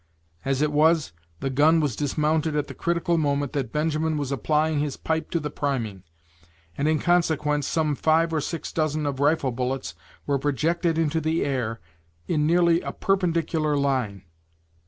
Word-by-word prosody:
As 135 Hz, +1 st, 0 dB
it 150 Hz, -, +1 dB
was, 155 Hz, -, +3 dB, 0.3 s
the 135 Hz, -, -1 dB
gun 155 Hz, +5 st, +4 dB
was 145 Hz, -7 st, 0 dB
dismounted 155 Hz, +3 st, 0 dB
at 150 Hz, -1 st, 0 dB
the -, -, -9 dB
critical 170 Hz, 0 st, 0 dB
moment 145 Hz, -2 st, 0 dB
that 135 Hz, -6 st, -2 dB
Benjamin 155 Hz, +1 st, 0 dB
was 140 Hz, -2 st, -3 dB
applying 150 Hz, +4 st, +1 dB
his 145 Hz, -2 st, -2 dB
pipe 160 Hz, 0 st, -2 dB
to 170 Hz, -, 0 dB
the 150 Hz, -1 st, -4 dB
priming, 115 Hz, -11 st, -2 dB, 0.7 s
and 140 Hz, -, 0 dB
in 155 Hz, 0 st, +3 dB
consequence 150 Hz, -4 st, +1 dB
some 155 Hz, -2 st, +1 dB
five 160 Hz, +3 st, +2 dB
or 155 Hz, -, +1 dB
six 165 Hz, +2 st, -4 dB
dozen 155 Hz, -1 st, -1 dB
of 140 Hz, -2 st, -2 dB
rifle 145 Hz, -2 st, +2 dB
bullets 125 Hz, -7 st, -3 dB, 0.3 s
were 140 Hz, -1 st, 0 dB
projected 160 Hz, +5 st, 0 dB
into 160 Hz, 0 st, +1 dB
the 160 Hz, +1 st, 0 dB
air, 120 Hz, -5 st, -2 dB, 0.5 s
in 150 Hz, -2 st, +1 dB
nearly 170 Hz, 0 st, +4 dB
a -, -, -4 dB
perpendicular 165 Hz, -5 st, 0 dB
line. 130 Hz, -9 st, -1 dB
150 Hz, 165 wpm, -25 LUFS, 140-160 Hz, 0.7 s, gun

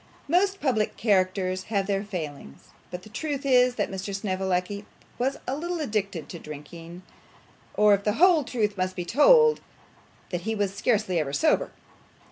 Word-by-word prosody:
Most 385 Hz, +5 st, +2 dB
public 230 Hz, -7 st, 0 dB
characters 185 Hz, -3 st, +1 dB
have 200 Hz, -3 st, -1 dB
their 195 Hz, 0 st, -1 dB
failings; 150 Hz, -, -7 dB, 0.2 s
and 180 Hz, 0 st, -6 dB
the -, -, -12 dB
truth 280 Hz, +4 st, -4 dB
is 250 Hz, -2 st, +4 dB
that 205 Hz, -, -2 dB
Mr 195 Hz, +1 st, -4 dB
Snevellicci 190 Hz, 0 st, -2 dB, 0.4 s
was 265 Hz, +3 st, 0 dB
a 260 Hz, -, -2 dB
little 345 Hz, +3 st, -3 dB
addicted 205 Hz, -, -2 dB
to 170 Hz, -, -7 dB
drinking; 165 Hz, +4 st, -10 dB, 0.7 s
or, 210 Hz, -1 st, +5 dB
if 200 Hz, 0 st, +1 dB
the 210 Hz, -, +1 dB
whole 340 Hz, -, +5 dB
truth 210 Hz, -6 st, -2 dB
must 185 Hz, 0 st, -1 dB
be 175 Hz, -, -4 dB
told, 460 Hz, -, +5 dB, 0.7 s
that 175 Hz, -2 st, -2 dB
he 220 Hz, +4 st, -2 dB
was 200 Hz, -2 st, -1 dB
scarcely 205 Hz, -4 st, 0 dB
ever 140 Hz, -3 st, -3 dB
sober. 310 Hz, -, +2 dB
205 Hz, 160 wpm, -26 LUFS, 185-255 Hz, 0.7 s, or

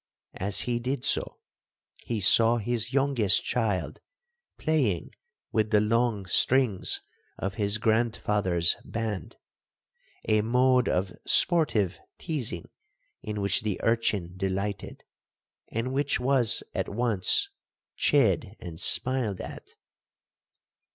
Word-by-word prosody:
As 100 Hz, +1 st, +1 dB
he 120 Hz, -1 st, -2 dB
did 125 Hz, +1 st, -3 dB
so, -, -, 0 dB, 0.7 s
he 115 Hz, -2 st, -3 dB
saw 115 Hz, +4 st, +7 dB
his 115 Hz, +1 st, -1 dB
youngest 135 Hz, -7 st, +2 dB
child 105 Hz, -7 st, -2 dB, 0.6 s
playing 130 Hz, -, -1 dB, 0.4 s
with 110 Hz, -1 st, 0 dB
the 105 Hz, -, +4 dB
long 110 Hz, -1 st, 0 dB
strings 115 Hz, +1 st, +2 dB, 0.4 s
of 95 Hz, 0 st, -4 dB
his 100 Hz, 0 st, 0 dB
grandfather's 105 Hz, -6 st, +1 dB
band,—a 110 Hz, 0 st, -6 dB
mode 125 Hz, +2 st, +2 dB
of 95 Hz, +1 st, -2 dB
sportive 110 Hz, -, +2 dB, 0.2 s
teazing 130 Hz, -, -4 dB, 0.6 s
in 105 Hz, -1 st, -5 dB
which 100 Hz, -, +1 dB
the 105 Hz, -3 st, -3 dB
urchin 105 Hz, -6 st, 0 dB
delighted, 95 Hz, +1 st, -4 dB, 0.7 s
and 115 Hz, +3 st, -3 dB
which 140 Hz, +1 st, 0 dB
was 125 Hz, -3 st, +2 dB
at -, -, -3 dB
once 110 Hz, -3 st, 0 dB, 0.4 s
chid 110 Hz, -7 st, +1 dB
and 85 Hz, -2 st, -9 dB
smiled 125 Hz, -7 st, +2 dB
at. -, -, -10 dB
110 Hz, 105 wpm, -27 LUFS, 100-125 Hz, 0.7 s, saw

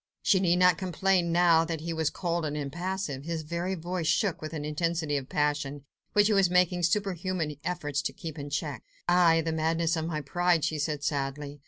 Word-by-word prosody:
She 190 Hz, -, +4 dB
need 175 Hz, -2 st, +3 dB
not 180 Hz, -1 st, +4 dB
complain 185 Hz, -1 st, +1 dB
now 170 Hz, -1 st, +5 dB
that 165 Hz, -2 st, -4 dB
he 165 Hz, +1 st, -3 dB
was 160 Hz, -1 st, 0 dB
cold 170 Hz, -2 st, -2 dB
and 150 Hz, -1 st, -2 dB
impassive; 165 Hz, 0 st, -3 dB
his 165 Hz, 0 st, -3 dB
very 170 Hz, +4 st, -2 dB
voice 175 Hz, -1 st, -3 dB
shook 195 Hz, 0 st, +1 dB
with 155 Hz, -, -5 dB
an 150 Hz, -3 st, -4 dB
intensity 160 Hz, 0 st, -1 dB
of 135 Hz, -2 st, -3 dB
passion, 145 Hz, -1 st, -1 dB, 0.3 s
which 205 Hz, 0 st, +5 dB
he 215 Hz, -, +3 dB
was 195 Hz, -3 st, +4 dB
making 180 Hz, 0 st, +2 dB
superhuman 175 Hz, -4 st, -1 dB
efforts 145 Hz, -5 st, -2 dB
to -, -, -2 dB
keep 160 Hz, -2 st, -8 dB
in 145 Hz, 0 st, -6 dB
check. 145 Hz, -4 st, -3 dB, 0.3 s
"Aye! 175 Hz, -2 st, +5 dB
the 165 Hz, 0 st, -2 dB
madness 165 Hz, +1 st, +1 dB
of 160 Hz, -1 st, -2 dB
my 155 Hz, -2 st, -2 dB
pride!" 175 Hz, +2 st, +1 dB
she 155 Hz, -1 st, -2 dB
said 150 Hz, -1 st, -2 dB
sadly. 145 Hz, 0 st, -3 dB
165 Hz, 200 wpm, -28 LUFS, 150-180 Hz, 0.3 s, now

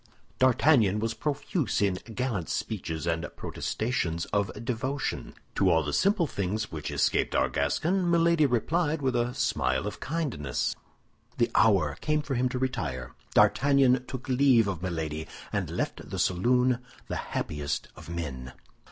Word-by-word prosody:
D'Artagnan 130 Hz, -5 st, +4 dB
was 115 Hz, +1 st, -1 dB
profuse 145 Hz, -, -1 dB
in 100 Hz, -2 st, +2 dB, 0.2 s
gallant 120 Hz, -10 st, -2 dB
speeches 85 Hz, -7 st, -3 dB
and 85 Hz, 0 st, -1 dB
protestations 85 Hz, -8 st, -2 dB
of 100 Hz, -1 st, +2 dB, 0.2 s
devotion. 130 Hz, +3 st, -3 dB, 0.2 s
To -, -, +3 dB
all 80 Hz, -1 st, +3 dB
the 75 Hz, 0 st, -3 dB
simple 195 Hz, -3 st, +3 dB
things 105 Hz, -, -2 dB
which 75 Hz, -3 st, -5 dB
escaped -, -, +1 dB
our -, -, +3 dB
Gascon, 170 Hz, -, 0 dB
Milady 170 Hz, -2 st, +4 dB
replied 150 Hz, +5 st, 0 dB
with 130 Hz, -2 st, +1 dB
a 120 Hz, +1 st, 0 dB
smile 120 Hz, -2 st, 0 dB
of -, -, -5 dB
kindness. 130 Hz, -, -2 dB, 0.6 s
The -, -, +2 dB
hour -, -, +3 dB
came 150 Hz, 0 st, +1 dB
for 145 Hz, -, -3 dB
him 125 Hz, 0 st, +1 dB
to 125 Hz, -, -3 dB
retire. 85 Hz, -, -3 dB, 0.2 s
D'Artagnan 135 Hz, -2 st, +4 dB
took 130 Hz, 0 st, -6 dB
leave 130 Hz, -4 st, +4 dB
of 95 Hz, -4 st, -3 dB
Milady, 80 Hz, -3 st, -3 dB, 0.3 s
and -, -, -1 dB
left -, -, -4 dB
the -, -, -4 dB
saloon 125 Hz, +7 st, +2 dB, 0.3 s
the -, -, -3 dB, 0.2 s
happiest 70 Hz, -1 st, -3 dB
of 80 Hz, +1 st, -12 dB
men. 70 Hz, -7 st, -5 dB
120 Hz, 145 wpm, -28 LUFS, 85-140 Hz, 0.6 s, D'Artagnan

